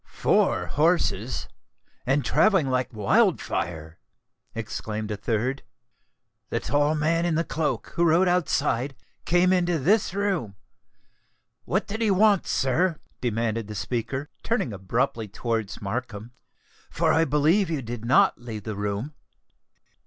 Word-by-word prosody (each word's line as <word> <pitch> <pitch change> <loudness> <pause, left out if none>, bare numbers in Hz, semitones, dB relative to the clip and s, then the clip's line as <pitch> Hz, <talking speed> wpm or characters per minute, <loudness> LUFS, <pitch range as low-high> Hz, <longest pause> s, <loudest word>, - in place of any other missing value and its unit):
"Four - - +1
horses—and 130 - -1
travelling 190 -11 +3
like 130 0 0
wild 105 -4 +3
fire," 80 -1 -4 0.6
exclaimed 110 0 -4
a - - -1
third. 115 +6 -1 0.9
"The - - -1
tall 145 +2 +1
man 165 +2 +1
in 170 -2 +1
the 165 - +1
cloak, 150 -8 -2
who 170 - +3
rode 170 +3 +4
outside, 140 -7 0 0.3
came 180 +2 +3
into 175 -2 +2
this 195 +6 +2
room. 190 - -1 1.1
What - - 0
did 220 +3 -5
he 220 - +2
want, 205 +1 +4
sir?" 155 +6 +1 0.2
demanded 115 -2 -1
the 105 - -7
speaker, 130 +6 -3
turning 205 - -1
abruptly 110 +3 -1
towards 110 0 -3
Markham; 110 +1 -4 0.6
"for - - +1
I 165 - +4
believe 160 +7 +2
you 155 -5 -2
did 115 -1 -6
not 120 0 +3
leave 110 -4 -7
the 110 0 -5
room." 105 +8 -3
130 Hz, 130 wpm, -25 LUFS, 110-170 Hz, 1.1 s, rode